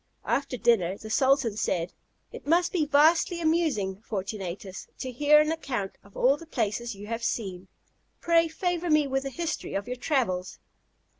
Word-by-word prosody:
After 275 -2 -1
dinner, 200 -6 +2
the 220 +1 -9
sultan 260 -3 +2
said: 175 -4 -1 0.4
"It - - -10
must 345 +3 +3
be 315 -5 +1
vastly 320 +4 +4
amusing, 310 - 0
Fortunatus, 195 -3 -5
to 260 - -5
hear 295 +4 +5
an 305 +1 +2
account 255 -11 -3
of 200 - -16
all 270 +3 +4
the 330 - -12
places 235 -4 -2
you 200 +1 -9
have 230 +2 -4
seen; 190 -6 -3 0.5
pray 335 -1 +3
favour 350 +1 -2
me 305 -1 +4
with 270 0 -1
a - - -2
history 335 +5 -4
of 200 0 -2
your 250 +1 -5
travels." 190 - -1
255 Hz, 165 wpm, -27 LUFS, 200-310 Hz, 0.5 s, hear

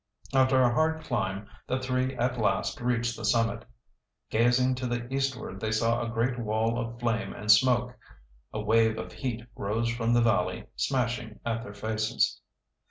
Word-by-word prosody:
After 130 0 +4
a 120 -1 +3
hard 160 +4 +1
climb, 105 -7 -2 0.2
the 130 - 0
three 130 0 -1
at 125 0 -1
last 100 +1 0
reached 120 -1 0
the 110 - -8
summit. 115 +2 +1 0.7
Gazing 125 +3 +3
to 125 0 -2
the 120 0 -2
eastward 135 -8 -2
they 110 +1 -2
saw 115 +2 +1
a 115 - -2
great 120 +2 0
wall 110 +1 0
of 115 0 -5
flame 115 -2 -1
and 105 0 +2
smoke. 125 +2 +4 0.6
A 110 - -4
wave 110 +1 +3
of 110 - -6
heat 120 -4 -4
rose 115 +3 -1
from 115 0 +1
the 120 - +5
valley, 115 -1 +1
smashing 120 -4 -1
at 115 -1 -1
their 105 -3 -9
faces. 110 +1 0
115 Hz, 165 wpm, -28 LUFS, 110-125 Hz, 0.7 s, the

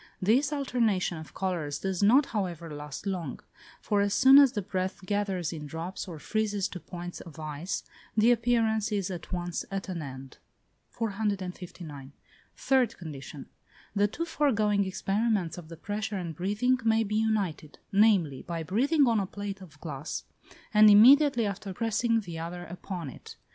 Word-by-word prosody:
This 250 +9 +3
alternation 230 - 0
of 155 - -12
colours 170 -7 -2
does 190 -1 -2
not, 250 +8 +6
however, 175 - -4
last 150 +2 -7
long; 180 -8 -3 0.4
for 205 -1 +2
as 200 0 +1
soon 265 +2 +8
as 275 -3 +6
the 205 - -2
breath 185 +1 -3
gathers 195 -5 -1
in 150 -2 -6
drops, 165 +6 -5
or 170 -3 -7
freezes 205 +2 -1
to 180 - -7
points 175 0 -8
of 165 -3 -12
ice, 155 +3 -4 0.3
the 220 +3 +6
appearance 225 -2 +2
is 195 -3 -1
at 175 -3 -7
once 175 -2 -2
at 195 0 -4
an 175 -3 -3
end. 135 -2 -9 0.5
459. 185 - -4 0.4
Third 255 -4 +2
condition. 145 -4 -8 0.5
The 205 0 +4
two 335 +11 -4
foregoing 215 -11 +2
experiments 195 -2 -1
of 160 -2 -12
the 165 - -9
pressure 205 +3 -3
and 170 -4 -5
breathing 210 - +1
may 225 0 +3
be 210 0 -1
united; 205 -9 -1
namely, 195 -10 +3
by 165 -1 -4
breathing 270 - +3
on 230 -2 +3
a 195 - -1
plate 200 0 -6
of 155 -6 -14
glass, 150 -2 -5 0.5
and 210 0 +8
immediately 245 +3 +7
after 200 -1 -4
pressing 230 +1 +1
the 170 -5 -7
other 175 +2 -5
upon 175 -3 -6
it. - - -12
195 Hz, 160 wpm, -28 LUFS, 170-220 Hz, 0.5 s, soon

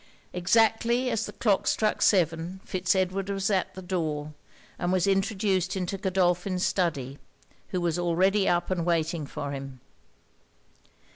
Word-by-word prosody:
Exactly 225 +6 +2
as 225 0 -1
the - - -6
clock 205 -4 +1
struck 215 -1 +1
seven, 170 -1 +2
Fitz 185 +1 0
Edward 190 +1 -1
was 195 +1 -1
at 190 -2 0
the 190 - -8
door; 155 -5 -3 0.5
and 175 - 0
was 185 -2 +2
introduced 195 -1 +1
into 185 +1 -2
Godolphin's 185 -1 0
study, 140 -7 -1 0.5
who 185 - -2
was 175 -1 -1
already 190 +4 +2
up 175 +1 0
and 175 -2 0
waiting 165 -2 0
for 140 +1 -5
him. 135 -2 -7
185 Hz, 140 wpm, -27 LUFS, 170-195 Hz, 0.5 s, Exactly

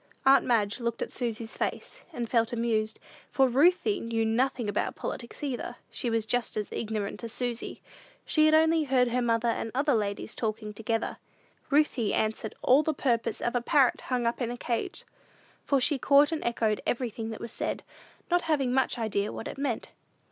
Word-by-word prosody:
Aunt 270 0 +7
Madge 220 -3 +1
looked 235 -1 -2
at - - -7
Susy's 230 -2 -4
face, - - -4
and 240 -7 -4
felt 230 -1 +2
amused, 225 -2 0 0.3
for 265 -1 +3
Ruthie 355 - +3
knew 230 -1 -1
nothing 240 +1 +1
about 205 0 -1
politics 235 +4 -6
either: 245 -3 -3 0.2
she 240 - -3
was 225 -1 0
as 230 -4 -1
ignorant 215 0 -3
as 230 - -5
Susy. 245 -2 -4 0.4
She 310 -1 +4
had 310 - +5
only 320 0 +4
heard 255 -2 +3
her 250 +1 0
mother 230 0 +1
and 225 - -2
other 285 +2 +2
ladies 210 0 -2
talking 215 -1 -3
together. 225 +1 -2 0.5
Ruthie 280 -7 +2
answered 220 0 -1
all 265 +4 +6
the 310 0 -1
purpose 240 -5 0
of 240 - -1
a 245 - +2
parrot 270 0 +3
hung 250 -2 -1
up 235 +2 -1
in 235 - 0
a 245 - -4
cage, 235 -1 -3 0.6
for 275 - +2
she 270 +2 +1
caught 285 +4 +5
and 320 - -2
echoed 225 -3 0
everything 230 -2 -2
that 220 - -6
was 230 - -6
said, - - -3 0.5
not 350 0 +4
having 270 -5 +2
much 260 -1 +1
idea 210 -3 -1
what - - -6
it - - -7
meant. 275 -5 -2
240 Hz, 185 wpm, -28 LUFS, 225-270 Hz, 0.6 s, Aunt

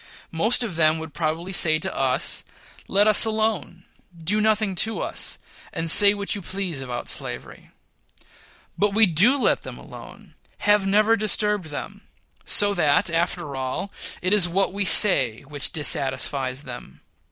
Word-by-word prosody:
Most 220 +10 +1
of 200 -8 -6
them 155 -1 +2
would 160 -1 -9
probably 165 +3 -4
say 155 -3 +2
to 155 - -5
us, 130 -1 0 0.4
"Let 205 +2 +2
us 215 - +6
alone, 215 -6 -3 0.3
do 190 +6 -2
nothing 215 -2 0
to 220 +5 -1
us, - - -4 0.3
and 165 -1 +2
say 205 +2 +6
what 200 0 -1
you 205 - -4
please 185 -5 -5
about 125 -2 -7
slavery." - - -5 1.1
But 205 0 -1
we 220 0 +6
do 200 - +3
let 265 - 0
them - - -10
alone - - -14 0.3
have 205 -1 +2
never 215 +3 +2
disturbed 210 -2 0
them 150 -2 -10 0.4
so 205 0 +5
that 165 -2 0
after 170 -3 -3
all 130 +9 -5 0.3
it 185 +2 +1
is 190 -4 +3
what 190 +2 -1
we 200 0 -2
say 135 - +4
which 145 0 -4
dissatisfies 135 -2 0
them. 120 - -12
180 Hz, 150 wpm, -22 LUFS, 155-210 Hz, 1.1 s, us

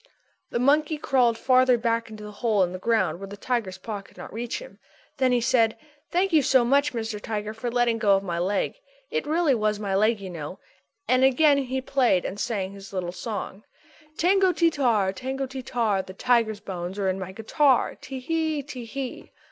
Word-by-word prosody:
The - - -2
monkey 295 +5 +2
crawled 250 -5 +2
farther 255 0 +4
back 230 0 -1
into 215 -1 -9
the 210 - -8
hole 210 -2 +1
in 175 - -1
the 185 - -6
ground 225 -4 +1
where 195 - -7
the 205 +1 -9
tiger's 215 -5 -2
paw 205 +1 -6
could 195 - -21
not - - -9
reach 235 +2 -3
him. - - -11 0.4
Then 260 -2 +2
he 245 -1 +2
said: 230 -2 +2 0.3
"Thank 365 +1 +1
you 310 - +6
so 260 -3 +4
much, 280 +4 +3
Mr. 220 -2 -4
Tiger, 210 -1 -4
for 225 +2 -4
letting 235 -1 +1
go 200 -2 +4
of 195 - -1
my 170 -3 -3
leg. 195 - -1 0.3
It 470 -9 -2
really 315 -2 +2
was 215 -3 0
my 200 -2 -2
leg, 215 +3 +3
you 190 -2 -7
know." 165 +1 -6 0.5
Again 265 +4 +4
he 260 -1 -2
played 250 -9 +2
and 200 - -4
sang 200 -5 -2
his 195 0 -11
little 180 -2 -3
song: 200 +2 -6 0.5
"_Tango 375 +1 +3
ti 335 -1 +4
tar, 225 -10 +1
tango 265 +6 -3
ti 265 0 -7
tar, 225 -6 0
The 185 0 -11
tiger's 225 -3 +1
bones 185 -1 -5
are 200 -1 0
in 190 0 0
my 190 0 -5
guitar. 255 +6 +2
Tee 270 -2 -8
hee, 315 +1 -1
Tee 255 -4 -8
hee. 260 +2 -6
230 Hz, 205 wpm, -25 LUFS, 200-265 Hz, 0.5 s, you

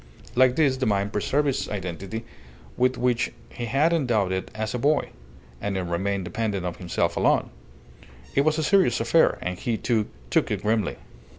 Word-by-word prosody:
Like 125 0 +4
this 140 -4 +3
the 130 - 0
mine 100 -1 +1
preserved 145 +8 +1
its 135 - -2
identity, 100 +3 -5 0.5
with 125 0 +2
which 125 -1 +1 0.2
he 120 - -5
had 140 +8 +2
endowed 120 - +1
it 95 0 -2
as 110 0 -3
a 125 - -2
boy; 145 +3 +2 0.5
and 100 -1 -2
it 95 - -1
remained 95 +2 -1
dependent 100 -2 -2
on 90 - -2
himself 85 -1 -1
alone. - - +2 0.8
It 140 - +4
was 155 +2 +2
a 160 - 0
serious 180 - +3
affair, 120 +9 +3
and 90 0 -3
he, 115 -2 -1
too, 110 -3 0 0.2
took - - +2
it - - -2
grimly. 110 -2 +1
115 Hz, 180 wpm, -25 LUFS, 100-130 Hz, 0.8 s, Like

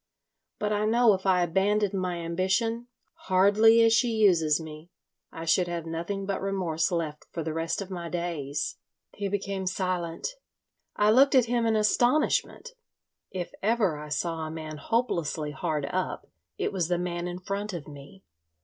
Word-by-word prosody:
But 210 0 -1
I 210 0 0
know 230 0 +5
if 190 0 -3
I 180 -2 +4
abandoned 200 +4 +1
my 185 -2 -2
ambition—hardly 215 +3 +2
as 225 0 +5
she 245 +2 +4
uses 180 -9 +3
me—I 160 +1 -11
should 175 +2 +3
have 170 -1 -4
nothing 170 +5 -4
but 195 -1 -2
remorse 185 -4 -1
left 160 -3 -3
for 165 - -4
the 160 0 -3
rest 165 +4 -2
of 195 - -13
my 170 -2 -5
days." 165 -5 -3 0.4
He 200 0 -3
became 195 -1 -3
silent. 180 -3 -2 0.7
I 210 +1 +4
looked 270 +4 +5
at 255 -3 +6
him 235 -1 +1
in 220 - +2
astonishment. 245 - +1 0.6
If 180 -2 -5
ever 205 -7 +1
I 150 0 -8
saw 165 +2 -2
a 160 -1 -4
man 155 -1 -6
hopelessly 165 - -1
hard 150 -1 -2
up - - -2 0.3
it - - -2
was 180 -4 0
the 175 0 +1
man 175 0 -3
in 175 0 -5
front 200 +3 -4
of 170 -6 -7
me. 145 +6 -12
185 Hz, 160 wpm, -27 LUFS, 165-210 Hz, 0.7 s, at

